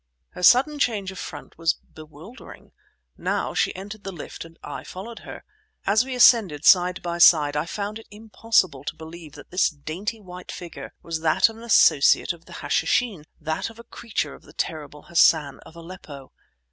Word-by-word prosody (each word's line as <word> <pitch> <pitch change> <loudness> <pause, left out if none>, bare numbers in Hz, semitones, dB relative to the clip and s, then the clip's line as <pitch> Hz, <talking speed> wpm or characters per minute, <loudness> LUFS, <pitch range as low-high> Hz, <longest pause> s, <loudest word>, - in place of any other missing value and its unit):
Her - - -10
sudden 265 - +5
change 205 -8 0
of 190 - -10
front 145 +1 -9
was 165 0 +2
bewildering. 155 - -14 0.5
Now, - - -2
she - - 0
entered 205 +2 -9
the 195 - -5
lift 170 -5 -8
and 165 0 -15
I - - -7
followed 220 +5 -9
her. - - -10 0.4
As 215 +4 +3
we 260 0 -5
ascended 205 - +5
side 180 0 +5
by 170 0 -3
side 150 -4 +6
I 150 +3 -1
found 205 +4 -4
it 225 - -15
impossible 210 - 0
to - - -4
believe 160 -1 -11
that - - -14
this 180 +1 +2
dainty 170 +9 -6
white 180 -2 -10
figure 175 -2 -9
was 165 -1 -4
that 160 +7 +3
of 225 - -11
an 230 - -12
associate 180 -8 +4
of 170 -1 -18
the - - -13
Hashishin, 210 -11 0
that 160 +5 -3
of 225 - -15
a 235 - -11
creature 220 -10 -4
of - - -14
the 150 - -18
terrible 150 -3 -5
Hassan 160 -4 +3
of 160 - -16
Aleppo. 165 -5 -11
180 Hz, 185 wpm, -24 LUFS, 160-215 Hz, 0.5 s, side